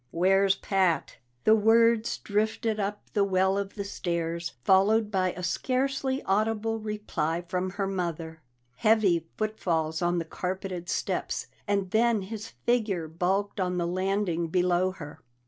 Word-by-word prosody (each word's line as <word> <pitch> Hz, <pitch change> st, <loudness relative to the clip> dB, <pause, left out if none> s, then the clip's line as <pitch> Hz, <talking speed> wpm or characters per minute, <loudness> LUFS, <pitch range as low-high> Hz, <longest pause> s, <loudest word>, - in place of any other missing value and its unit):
"Where's 195 Hz, +3 st, +3 dB
Pat?" 190 Hz, -4 st, 0 dB, 0.3 s
The 215 Hz, -, +6 dB
words 225 Hz, +1 st, +4 dB
drifted 215 Hz, +1 st, -1 dB
up 205 Hz, +1 st, -2 dB
the 205 Hz, -, +3 dB
well 190 Hz, 0 st, +2 dB
of 200 Hz, 0 st, -3 dB
the 200 Hz, -, -3 dB
stairs, 170 Hz, -3 st, -3 dB
followed 210 Hz, -, +4 dB
by 185 Hz, -2 st, +1 dB
a 180 Hz, -, -7 dB
scarcely 265 Hz, +7 st, -1 dB
audible 220 Hz, +2 st, 0 dB
reply 180 Hz, -6 st, -2 dB
from 185 Hz, +1 st, -1 dB
her 200 Hz, -1 st, -1 dB
mother. 170 Hz, -4 st, -4 dB, 0.4 s
Heavy 190 Hz, -, +3 dB
footfalls 165 Hz, -7 st, -1 dB
on 175 Hz, 0 st, +1 dB
the 165 Hz, -, -1 dB
carpeted 180 Hz, 0 st, -4 dB
steps, -, -, -2 dB, 0.2 s
and 200 Hz, -2 st, 0 dB
then 225 Hz, -2 st, +3 dB
his 215 Hz, +2 st, -6 dB, 0.2 s
figure 210 Hz, -9 st, +1 dB
bulked 190 Hz, +6 st, -1 dB
on 180 Hz, -1 st, 0 dB
the 175 Hz, -, 0 dB
landing 185 Hz, -1 st, 0 dB
below 180 Hz, +1 st, +2 dB
her. 150 Hz, -6 st, -9 dB
195 Hz, 140 wpm, -28 LUFS, 175-215 Hz, 0.4 s, The